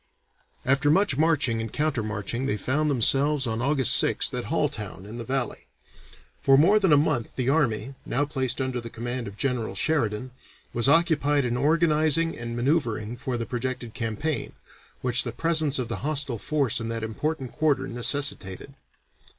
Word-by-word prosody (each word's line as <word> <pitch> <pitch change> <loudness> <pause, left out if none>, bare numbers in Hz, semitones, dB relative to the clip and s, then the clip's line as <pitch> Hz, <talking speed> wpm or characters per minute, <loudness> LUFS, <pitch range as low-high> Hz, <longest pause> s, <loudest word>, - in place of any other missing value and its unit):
After 135 +2 +2
much 190 -1 +3
marching 145 -7 +1
and 115 -1 -5
counter 150 -5 -1
marching 110 +4 -3
they 105 - -1
found 145 +9 0
themselves 140 +2 +3
on 115 0 -2
August 135 -2 +4
6th - - 0
at - - -3
Halltown 95 - -3
in 110 +4 -8
the - - -4
Valley. 130 0 -3 0.7
For 135 -1 +5
more 195 +9 +5
than 190 -5 +2
a 145 - +7
month 145 -6 0
the 130 0 -1
army, 135 -3 0
now 145 +4 0
placed 130 -3 -1
under 130 -2 -2
the 115 - -8
command 120 +1 -5
of 100 0 -10
General 125 -2 -1
Sheridan, 125 -6 -1 0.4
was 120 +3 +1
occupied 145 -4 +3
in 120 -1 -1
organizing 155 +2 +2
and 115 0 -6
manoeuvering 120 -4 -1
for 125 0 -4
the 115 - -3
projected 120 -2 -4
campaign, 115 +7 -3 0.5
which 125 0 +3
the 120 - -4
presence 155 +2 +2
of 125 -3 -2
the 115 - -4
hostile 140 -5 -1
force 140 -5 0
in 115 - -4
that 115 -1 -3
important 130 +4 -3
quarter 155 -2 0
necessitated. 135 -2 0
130 Hz, 165 wpm, -25 LUFS, 115-150 Hz, 0.7 s, a